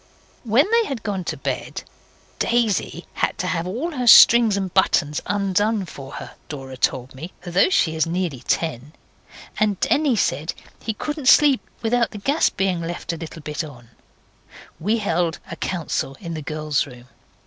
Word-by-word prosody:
When 240 +5 +4
they 465 0 +4
had 270 - -5
gone 200 -4 -2
to - - -3
bed - - -4 0.6
(Daisy 220 -7 0
had - - -1
to - - -2
have 180 -1 -1
all 255 - -3
her 250 -5 -3
strings 230 -2 +8
and 190 -2 -3
buttons 155 -5 +2
undone 205 +1 +1
for 135 -5 -10
her, - - -7 0.2
Dora 135 -3 -7
told 130 0 -1
me, 155 +7 -9
though 180 - +3
she 160 - +2
is 160 +1 +1
nearly 170 -5 -2
ten, 150 -3 -1 0.7
and 210 -3 +1
Denny 285 -4 +2
said 160 -5 -1 0.3
he 220 - -3
couldn't 295 +2 -4
sleep 285 -1 +6 0.2
without 235 +1 +2
the 215 - -9
gas 280 +10 +2
being 190 -3 -1
left 170 0 -4
a - - -5
little 160 -1 -9
bit 150 +2 -3
on) 125 -6 -12 0.9
we 210 +8 +1
held 175 -5 0
a - - -4
council 160 -6 -3
in 170 -3 -6
the 155 - -5
girls' 150 0 -1
room. 125 -2 -13
180 Hz, 170 wpm, -22 LUFS, 155-225 Hz, 0.9 s, strings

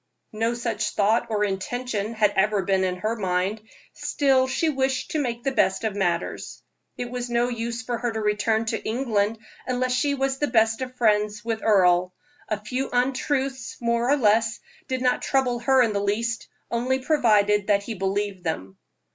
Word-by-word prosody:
No 225 +2 0
such 225 -3 -2
thought 210 +3 +2
or 210 -2 0
intention 215 +2 -2
had 210 -2 +3
ever 200 0 +2
been 190 -1 +1
in 185 -1 0
her 215 +5 -2
mind, 190 +1 -1 0.3
still 265 -2 +2
she 320 +5 0
wished 265 -3 -1
to 310 - 0
make 240 -3 -3
the 270 - 0
best 210 -5 +1
of 220 -3 -1
matters. 175 -4 -2 0.3
It 245 -1 -4
was 245 -1 -4
no 240 +1 +1
use 235 0 -4
for 240 -2 -3
her 240 -2 -1
to 220 - -3
return 215 +1 +1
to 225 0 -2
England 220 -3 0 0.3
unless 255 0 0
she 280 +3 +1
was 270 0 -1
the 295 - +1
best 225 -1 +2
of 255 0 -5
friends 210 -2 +1
with 225 -1 -2
him. 180 -4 +4 0.4
A 215 - -1
few 255 +5 -2
untruths, 260 +1 -1
more 235 +1 0
or 290 - +4
less, 225 -1 +2 0.3
did 260 -1 -2
not 250 -1 +2
trouble 255 -3 +1
her 260 +1 +4
in 225 -3 0
the 200 - 0
least, 230 +3 -1 0.2
only 250 +3 +1
provided 210 -8 +2
that 200 -1 +3
he 225 - -5
believed 195 -1 -2
them. 95 - -4
230 Hz, 180 wpm, -24 LUFS, 210-250 Hz, 0.4 s, him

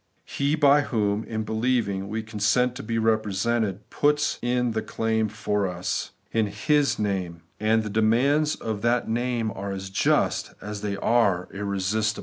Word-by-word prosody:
He 140 +2 0
by 145 -1 +5
whom, 105 -5 0
in 110 -1 -3
believing, 110 -3 0
we 110 +1 -3
consent 110 +3 +1
to - - -6
be 115 +1 -2
represented, 110 -1 0
puts 150 0 +1
in 125 0 +1
the 110 0 -1
claim 110 0 -1
for 105 -1 -1
us, 90 0 -3 0.2
in 110 -2 +1
His 140 +8 +1
name; 95 -5 -2 0.2
and 110 +1 +2
the 105 - -4
de 110 +2 +1
mands 140 +8 +3
of 110 -2 -4
that 120 +2 +1
name 120 -1 -1
are 100 -2 -5
as 95 0 -6
just 95 - +1
as 105 -1 -6
they 100 -1 -2
are 100 -5 +2
irresistible. 100 +2 -1
110 Hz, 160 wpm, -25 LUFS, 100-120 Hz, 0.2 s, by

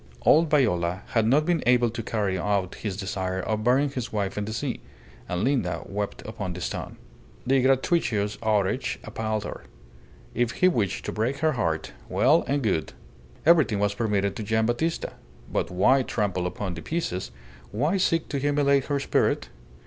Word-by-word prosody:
Old 160 +1 +5
Viola 95 - +1
had 115 -3 +2
not 145 +6 +4
been 175 -3 +1
able 120 -2 +4
to 115 - -4
carry 105 -4 -1
out 95 0 0
his 100 -4 -5
desire 95 -2 -2
of 110 +3 -2
burying 135 +4 +3
his 125 -4 -4
wife 100 -3 -2
in 105 - -2
the 110 - -5
sea; 125 +3 -3 0.5
and 90 +2 -1
Linda 125 -8 0
wept 100 0 -4
upon 100 -4 -5
the 90 - -7
stone. - - -4 0.5
The 135 +1 +3
gratuitous 125 - +1
outrage 110 +3 0
appalled 110 -1 -3
her. - - -6 0.7
If 120 0 0
he 185 - +3
wished 115 - 0
to - - -2
break 120 +6 -1
her 155 - +4
heart 80 - -2 0.2
well 150 +7 +4
and 140 0 0
good. 95 -8 0 0.5
Everything 155 -10 +5
was 100 0 +1
permitted 100 -3 0
to - - -4
Gian' 110 +1 +1
Battista. 140 +9 -1 0.4
But - - -1
why 125 +10 +4
trample 95 -7 -1
upon 95 0 -4
the 80 - -7
pieces; 95 - -3 0.4
why 150 - +1
seek 165 -3 +1
to 140 - -1
humiliate 140 -1 +2
her 145 -1 0
spirit? 140 - +1
110 Hz, 170 wpm, -26 LUFS, 100-135 Hz, 0.7 s, Old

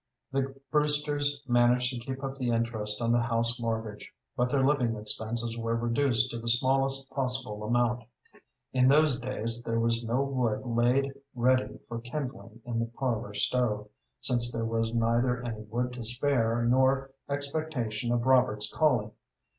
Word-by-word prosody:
The 135 0 -2
Brewsters 145 -1 +4
managed 120 +1 +3
to 120 - -5
keep 130 +3 -7
up 135 0 -5
the 125 -2 -1
interest 115 -2 -1
on 115 - +1
the 120 0 +3
house 115 +1 +2
mortgage, 110 -2 -4 0.2
but 125 -1 +1
their 135 0 +2
living 130 -5 +1
expenses 110 +2 -3
were 115 0 -1
reduced 120 +1 +1
to 115 - -5
the 115 - -8
smallest 135 +2 +1
possible 125 -5 -2
amount. 120 +1 0 0.7
In 130 -1 +4
those 145 -1 +4
days 120 -2 -2
there 115 -1 -2
was 115 0 +1
no 120 +4 0
wood 125 -5 -1
laid 125 +3 +1 0.2
ready 130 +1 +1
for 115 0 -6
kindling 120 -3 -7
in 120 -1 -2
the 115 - -1
parlor 115 -3 -3
stove, 105 -1 0 0.3
since 120 -2 +2
there 115 -1 -3
was 115 0 -1
neither 120 +2 +1
any 110 -2 -5
wood 125 +3 -3
to 125 -1 -7
spare 120 -1 +1
nor 130 +2 +2 0.2
expectation 140 -5 -2
of 120 0 0
Robert's 105 -5 +2
calling. 125 -9 +1
120 Hz, 155 wpm, -28 LUFS, 115-130 Hz, 0.7 s, Brewsters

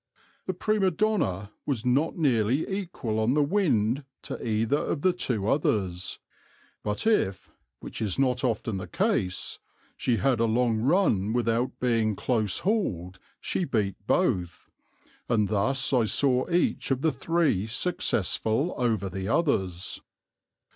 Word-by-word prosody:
"The 185 - 0
Prima 210 0 +1
Donna 160 - 0 0.2
was 130 -5 -1
not 140 +8 +1
nearly 130 -3 +2
equal 170 - -3
on 115 +5 +2
the 150 - +4
wind 140 - +1 0.2
to - - -6
either 115 +5 +1
of 145 - -3
the 185 - +4
two 120 - -2
others, 95 -9 0 0.6
but 105 - -2
if 100 - +1 0.3
(which - - -6
is 105 -4 0
not 125 -2 +1
often 110 -2 -1
the 95 - -6
case) 185 - -1 0.4
she 120 -3 0
had 125 +3 +1
a 115 - +3
long 115 0 +2
run 115 - +2
without 120 +1 0
being 115 -4 +1
close 110 -3 0
hauled 95 - -1 0.2
she - - -1
beat 110 - 0
both, 90 -2 0 0.6
and 105 -4 +2
thus 130 +7 +1
I 120 -3 +4
saw 130 - +1
each 175 0 +1
of 135 -1 0
the 160 - +3
three 145 - 0
successful 115 - 0
over 115 -5 +1
the 95 +1 -4
others. 95 - 0
120 Hz, 140 wpm, -27 LUFS, 105-150 Hz, 0.6 s, the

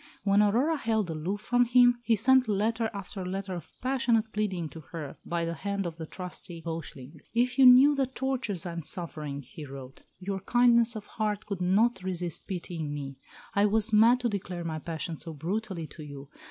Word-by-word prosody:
When 200 0 +4
Aurora 245 +10 +2
held 220 - 0
aloof 175 +6 -3
from 245 0 +3
him, 245 0 +5
he 235 -1 +2
sent 255 +3 +4
letter 220 +2 0
after 195 -1 -6
letter 190 +1 -4
of 175 - -7
passionate 245 -4 +1
pleading 190 -6 -1
to 160 - -10
her 155 -1 -8
by 170 -1 -2
the 165 - -2
hand 200 +4 -3
of 165 -1 -5
the 160 -1 -6
trusty 180 -1 -8
Beuchling. 160 -3 -7 0.2
"If 250 +3 +1
you 260 - +9
knew 260 +4 +8
the 275 -2 +1
tortures 260 -9 -3
I 175 - -3
am 170 0 -5
suffering," 150 -4 -3
he 155 +4 -10
wrote, 135 -2 -10 0.2
"your 195 +1 -4
kindness 235 +2 +4
of 210 -1 -6
heart 210 -2 -3
could 200 -3 -4
not 195 +4 +2
resist 180 -3 -3
pitying 170 -5 -4
me. 140 -2 -6 0.3
I 200 +1 +4
was 220 +2 +2
mad 230 +4 +6
to 245 - +1
declare 180 -4 -4
my 160 -1 -3
passion 165 +1 -4
so 165 +1 -7
brutally 185 +2 -3
to 155 +2 -12
you. 140 -2 -9
195 Hz, 195 wpm, -28 LUFS, 165-230 Hz, 0.3 s, you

